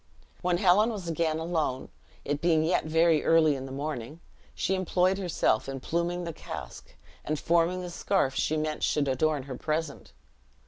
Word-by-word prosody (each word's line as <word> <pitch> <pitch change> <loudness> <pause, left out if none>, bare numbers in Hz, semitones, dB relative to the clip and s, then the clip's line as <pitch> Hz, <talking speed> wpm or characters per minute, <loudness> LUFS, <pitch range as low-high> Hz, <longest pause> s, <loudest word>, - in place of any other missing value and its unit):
When 180 -1 +1
Helen 195 +5 +4
was 205 -6 -5
again 160 -1 0
alone, 160 -6 -2 0.4
it 145 +1 -2
being 165 -2 +3
yet 165 +1 +1
very 160 0 +3
early 160 -3 +4
in 135 0 -6
the - - -9
morning, 145 0 -5 0.4
she 190 - 0
employed 185 0 +1
herself 170 - 0
in 135 0 -4
pluming 170 +5 -2
the 170 -1 -5
casque, 75 - -9 0.3
and 155 - -2
forming 170 +3 +1
the 175 - -6
scarf 170 -6 0
she 155 +3 0
meant 155 0 -2
should 145 -2 +1
adorn 140 +2 +1
her 130 -1 -7
present. 155 +2 -3
160 Hz, 170 wpm, -28 LUFS, 145-175 Hz, 0.4 s, Helen